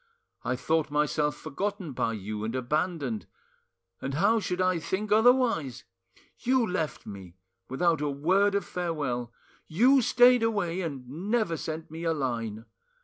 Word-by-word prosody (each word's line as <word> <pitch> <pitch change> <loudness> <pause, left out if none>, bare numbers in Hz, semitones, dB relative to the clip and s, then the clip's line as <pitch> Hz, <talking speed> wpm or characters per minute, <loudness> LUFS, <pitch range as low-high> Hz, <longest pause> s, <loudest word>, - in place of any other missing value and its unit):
I 125 - -1
thought 155 +4 0
myself 150 0 +1
forgotten 185 +2 -4
by 115 -3 -1
you 105 0 -5
and 115 +3 -3
abandoned; 130 - -2 0.7
and 135 0 -3
how 205 +8 +3
should 180 -3 -3
I 185 -2 +2
think 200 +6 -3
otherwise? 220 - +3 0.6
You 255 -1 +2
left 180 -6 -3
me 95 -3 -10 0.3
without 160 +3 +1
a 150 - 0
word 185 +8 +2
of 200 -3 0
farewell, 145 -9 -3 0.4
you 255 - +4
stayed 245 +1 +5
away 200 -6 0
and 140 -7 -5 0.2
never 215 -7 +1
sent 160 0 -6
me 165 +1 -7
a 165 -1 +1
line! 115 -6 -3
160 Hz, 145 wpm, -28 LUFS, 130-200 Hz, 0.7 s, stayed